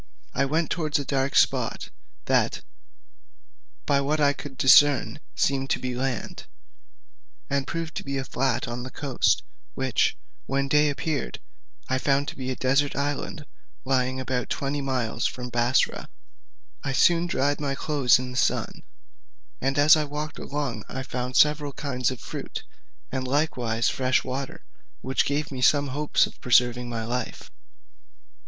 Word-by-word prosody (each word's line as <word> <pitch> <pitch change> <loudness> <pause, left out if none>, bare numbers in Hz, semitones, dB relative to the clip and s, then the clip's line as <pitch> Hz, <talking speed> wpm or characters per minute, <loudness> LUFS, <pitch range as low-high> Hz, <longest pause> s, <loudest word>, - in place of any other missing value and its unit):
I 140 - +1
went 155 +3 0
towards 155 -4 0
a 140 - -3
dark 135 0 -1
spot, - - +2 0.3
that, - - +1 1.2
by 140 -1 +2
what 150 +3 0
I 145 -1 +4
could 140 -2 -9
discern, 145 +3 +5 0.2
seemed 135 -1 +1
to - - +1
be 125 -1 -3
land, 125 -2 -4 1.0
and 140 -1 0
proved 165 -1 -4
to - - -4
be 140 0 -3
a 135 - -2
flat 130 -2 -1
on 120 +1 -4
the 130 - -6
coast, 135 -1 +1 0.3
which, - - +1 0.3
when 135 +1 0
day 150 +2 +4
appeared, 145 - -3 0.5
I 130 0 0
found 140 +1 +1
to - - -9
be 130 -1 -5
a 130 - -2
desert 135 +3 +1
island, 145 +1 -3 0.4
lying 130 0 +1
about 130 -1 -2
twenty 140 +1 -2
miles 125 -4 -1
from 125 -1 -6
Bussorah. 120 +2 +1 0.8
I 135 - -2
soon 170 +5 +4
dried 145 -3 0
my 140 -2 -1
clothes 140 -4 +3
in 125 0 -5
the 125 - -6
sun, - - 0 0.8
and 135 +2 0
as 145 +2 +7
I 155 -1 0
walked 150 +1 -5
along 140 -7 -3
I 130 - -4
found 125 0 -3
several 150 -1 +3
kinds 130 -4 -1
of 130 -2 -6
fruit, - - -6 0.5
and 130 0 -2
likewise 125 -5 0
fresh 130 0 +1
water, 130 +1 -5 0.4
which 130 0 +1
gave 145 +1 -1
me 130 -2 -5
some 145 +1 +4
hopes 150 +3 +2
of - - -13
preserving 125 -1 +3
my 115 -2 -3
life. 125 0 -4
135 Hz, 155 wpm, -25 LUFS, 130-145 Hz, 1.2 s, as